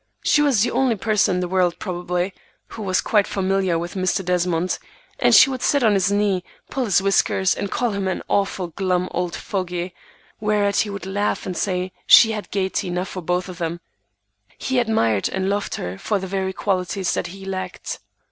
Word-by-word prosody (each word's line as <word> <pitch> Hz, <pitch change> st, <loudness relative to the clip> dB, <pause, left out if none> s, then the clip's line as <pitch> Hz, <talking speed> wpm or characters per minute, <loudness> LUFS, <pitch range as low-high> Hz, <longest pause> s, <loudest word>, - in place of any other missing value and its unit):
She 295 Hz, -, +4 dB
was 270 Hz, -8 st, +3 dB
the -, -, 0 dB
only 260 Hz, -4 st, +2 dB
person 210 Hz, -2 st, +1 dB
in -, -, 0 dB
the 180 Hz, -, -1 dB
world, 180 Hz, -1 st, +1 dB
probably, 180 Hz, 0 st, -2 dB, 0.4 s
who 225 Hz, -, -8 dB
was 185 Hz, -2 st, +1 dB
quite 210 Hz, -2 st, +2 dB
familiar 190 Hz, -2 st, 0 dB
with 170 Hz, +1 st, -4 dB
Mr. 185 Hz, 0 st, 0 dB
Desmond, 180 Hz, -1 st, 0 dB, 0.4 s
and -, -, +5 dB
she -, -, +9 dB
would 255 Hz, -1 st, -4 dB
sit 285 Hz, -3 st, +2 dB
on 220 Hz, -2 st, +5 dB
his 195 Hz, 0 st, +2 dB
knee, 200 Hz, -3 st, +1 dB, 0.3 s
pull 265 Hz, -2 st, -1 dB
his 195 Hz, -3 st, +2 dB
whiskers, 190 Hz, -1 st, +2 dB
and 200 Hz, -, -4 dB
call 240 Hz, +2 st, 0 dB
him 200 Hz, -1 st, -2 dB
an 185 Hz, -, -2 dB
"awful 195 Hz, -3 st, 0 dB
glum 180 Hz, +1 st, -1 dB
old 180 Hz, -1 st, -2 dB
fogy," 180 Hz, -2 st, -3 dB, 0.5 s
whereat 210 Hz, -1 st, +1 dB
he 215 Hz, -, +2 dB
would 200 Hz, -2 st, -6 dB
laugh 205 Hz, +2 st, -1 dB
and 185 Hz, -, -4 dB
say 185 Hz, +1 st, -1 dB, 0.2 s
she 225 Hz, -, +8 dB
had 210 Hz, -1 st, -5 dB
gayety 195 Hz, 0 st, -1 dB
enough 180 Hz, +1 st, -2 dB
for 185 Hz, -, -6 dB
them 175 Hz, -1 st, -2 dB
both. -, -, -27 dB, 0.8 s
He 260 Hz, -1 st, 0 dB
admired 115 Hz, -, +1 dB
and 190 Hz, 0 st, -2 dB
loved 205 Hz, 0 st, -2 dB
her 90 Hz, +2 st, -5 dB
for 210 Hz, -, 0 dB
the 190 Hz, -, -4 dB
very 190 Hz, 0 st, -2 dB
qualities 190 Hz, -1 st, -1 dB
that -, -, -2 dB
he 195 Hz, +2 st, -10 dB
lacked. 185 Hz, -2 st, -5 dB
190 Hz, 195 wpm, -22 LUFS, 180-205 Hz, 0.8 s, she